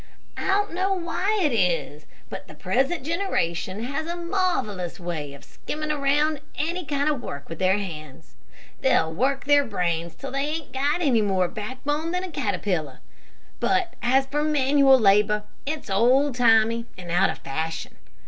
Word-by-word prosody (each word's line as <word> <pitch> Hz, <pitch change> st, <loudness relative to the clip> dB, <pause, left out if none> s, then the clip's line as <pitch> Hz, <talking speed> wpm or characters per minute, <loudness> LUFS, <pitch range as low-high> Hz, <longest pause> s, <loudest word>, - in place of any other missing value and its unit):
"I -, -, -4 dB
don't 405 Hz, 0 st, +1 dB
know 380 Hz, +2 st, +1 dB
why 370 Hz, +4 st, -1 dB
it 300 Hz, -, +3 dB
is, 170 Hz, -8 st, 0 dB, 0.2 s
but -, -, -8 dB
the 155 Hz, -, -12 dB
present 260 Hz, -, 0 dB
generation 220 Hz, -, -1 dB
has 285 Hz, +5 st, -3 dB
a 340 Hz, -, -3 dB
marvelous 340 Hz, -, -1 dB
way 155 Hz, -5 st, -5 dB
of 140 Hz, -, -15 dB
skimming 305 Hz, 0 st, -5 dB
around 295 Hz, +1 st, +1 dB
any 340 Hz, +3 st, -2 dB
kind 285 Hz, 0 st, 0 dB
of 295 Hz, -5 st, 0 dB
work 140 Hz, -, -7 dB
with 165 Hz, -, -8 dB
their 190 Hz, +1 st, +3 dB
hands, 155 Hz, -, -8 dB, 0.5 s
They'll 160 Hz, 0 st, +2 dB
work 270 Hz, +10 st, 0 dB
their 290 Hz, 0 st, +5 dB
brains 170 Hz, -7 st, -2 dB
till 270 Hz, -, -7 dB
they 275 Hz, +3 st, -1 dB
haven't 320 Hz, -2 st, -6 dB
got 285 Hz, +6 st, 0 dB
any 250 Hz, -7 st, +3 dB
more 190 Hz, -3 st, +1 dB
backbone 260 Hz, -, -3 dB
than 360 Hz, +2 st, -1 dB
a 370 Hz, -, -5 dB
caterpillar, -, -, -2 dB, 0.6 s
but 370 Hz, -2 st, +1 dB
as 265 Hz, +3 st, +3 dB
for 290 Hz, +3 st, -1 dB
manual 280 Hz, -2 st, +5 dB
labor, 210 Hz, -1 st, +4 dB, 0.2 s
it's 305 Hz, 0 st, -3 dB
old 250 Hz, +8 st, +3 dB
timey 230 Hz, -1 st, +3 dB
and 175 Hz, -2 st, -7 dB
out 195 Hz, +3 st, +3 dB
of -, -, -3 dB
fashion. 160 Hz, +4 st, -4 dB
265 Hz, 165 wpm, -25 LUFS, 185-305 Hz, 0.6 s, their